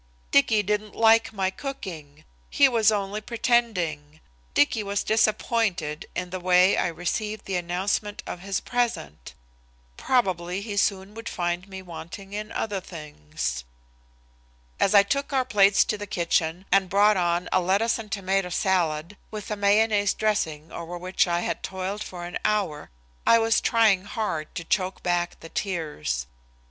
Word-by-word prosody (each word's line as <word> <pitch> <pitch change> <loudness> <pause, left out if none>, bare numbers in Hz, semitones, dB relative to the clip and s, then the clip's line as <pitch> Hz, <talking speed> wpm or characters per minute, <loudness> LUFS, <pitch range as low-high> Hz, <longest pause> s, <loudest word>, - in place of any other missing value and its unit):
Dicky 210 +8 +4
didn't 210 +1 -2
like 225 0 +5
my 190 -3 -1
cooking! 160 - -8 0.2
He 280 - +5
was 225 -4 +3
only 205 0 -2
pretending! 190 -11 0 0.4
Dicky 180 +9 +3
was 200 -1 -2
disappointed 215 -7 0
in 180 -1 -3
the 185 - -3
way 180 +1 +4
I - - +1
received 205 +5 -3
the 195 - -3
announcement 185 +4 -2
of - - -6
his 195 +1 -2
present! 230 - -3 0.6
Probably 185 -7 0
he 205 -1 -5
soon 195 0 0
would 225 +1 -6
find 175 0 -2
me 190 -1 -8
wanting 185 +3 -9
in 215 +1 -5
other 205 -3 -2
things. 75 - -5 1.2
As 200 - +3
I 200 - +8
took 280 +8 -1
our 260 -1 +2
plates 200 -4 +5
to 210 - -2
the 205 - -6
kitchen 170 -2 0
and 195 -1 +3
brought 205 +2 +5
on 175 -1 0
a 185 - +3
lettuce 200 +6 +1
and 215 -1 -9
tomato 195 -2 0
salad 175 -1 0
with 215 -1 -7
a - - 0
mayonnaise 205 0 +3
dressing 165 -8 -1
over 170 +1 -6
which 185 +2 +1
I 175 0 0
had - - -3
toiled 190 +2 -4
for 175 -1 -7
an 175 - -5
hour, 205 -9 -1 0.4
I 230 - +7
was 225 0 +2
trying 215 -5 +3
hard 200 -8 -3
to 165 - -4
choke 185 +2 -1
back 175 -1 -1
the 165 - -10
tears. 150 - -3
195 Hz, 155 wpm, -25 LUFS, 175-215 Hz, 1.2 s, I